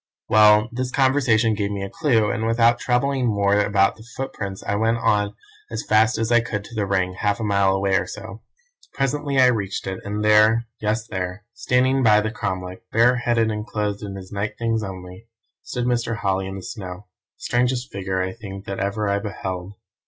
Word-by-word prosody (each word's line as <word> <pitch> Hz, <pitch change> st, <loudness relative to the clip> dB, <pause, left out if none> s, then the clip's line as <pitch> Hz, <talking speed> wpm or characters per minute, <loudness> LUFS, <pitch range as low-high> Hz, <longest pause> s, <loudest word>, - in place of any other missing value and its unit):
"Well, 105 Hz, 0 st, +6 dB
this 125 Hz, +1 st, -3 dB
conversation 125 Hz, -5 st, +3 dB
gave 100 Hz, -1 st, -1 dB
me 100 Hz, -1 st, -4 dB
a 100 Hz, -, -5 dB
clue, 115 Hz, -9 st, +2 dB
and 110 Hz, 0 st, -2 dB
without 115 Hz, +1 st, +3 dB
troubling 130 Hz, +1 st, +1 dB
more 100 Hz, -2 st, +2 dB
about 100 Hz, -1 st, +2 dB
the 110 Hz, -, -14 dB
footprints 100 Hz, -7 st, -5 dB
I -, -, -2 dB
went 110 Hz, +3 st, +1 dB
on 105 Hz, -3 st, +1 dB, 0.3 s
as -, -, -4 dB
fast 110 Hz, +3 st, +3 dB
as 115 Hz, +1 st, -1 dB
I 120 Hz, -, +6 dB
could 105 Hz, -3 st, -3 dB
to 120 Hz, -, -13 dB
the 105 Hz, -3 st, -1 dB
Ring, 95 Hz, -1 st, 0 dB
half 105 Hz, +2 st, 0 dB
a -, -, -3 dB
mile 100 Hz, -2 st, +2 dB
or 95 Hz, 0 st, +1 dB
so -, -, -8 dB
away. 110 Hz, 0 st, -9 dB, 0.6 s
Presently 140 Hz, +1 st, -1 dB
I 130 Hz, -, +7 dB
reached 105 Hz, -6 st, 0 dB
it, 95 Hz, -1 st, -4 dB
and 105 Hz, +1 st, -3 dB
there 110 Hz, +2 st, +5 dB
yes, 110 Hz, +1 st, -1 dB
there 90 Hz, -1 st, -5 dB
standing 130 Hz, +3 st, +1 dB
by 105 Hz, -4 st, +5 dB
the 110 Hz, +1 st, -2 dB
cromlech, 95 Hz, -4 st, -4 dB
bareheaded, 120 Hz, -1 st, +3 dB
and 105 Hz, 0 st, -3 dB
clothed 105 Hz, -2 st, -3 dB
in 100 Hz, -2 st, -6 dB
his 95 Hz, -1 st, -10 dB
night 105 Hz, +1 st, -3 dB
things 115 Hz, -1 st, 0 dB
only, 95 Hz, +1 st, -8 dB, 0.3 s
stood 125 Hz, -1 st, -4 dB
Mr. 120 Hz, -2 st, 0 dB
Holly 95 Hz, -3 st, -1 dB
in 95 Hz, -, -6 dB
the 95 Hz, -, -8 dB
snow, 95 Hz, -2 st, -7 dB, 0.3 s
the -, -, -16 dB
strangest 125 Hz, +1 st, 0 dB
figure, 95 Hz, -1 st, -2 dB
I 95 Hz, 0 st, -3 dB
think, 100 Hz, -3 st, -9 dB
that 100 Hz, -, -5 dB
ever 100 Hz, +1 st, -1 dB
I 100 Hz, 0 st, +1 dB
beheld. 95 Hz, -2 st, -5 dB
105 Hz, 195 wpm, -22 LUFS, 100-115 Hz, 0.6 s, I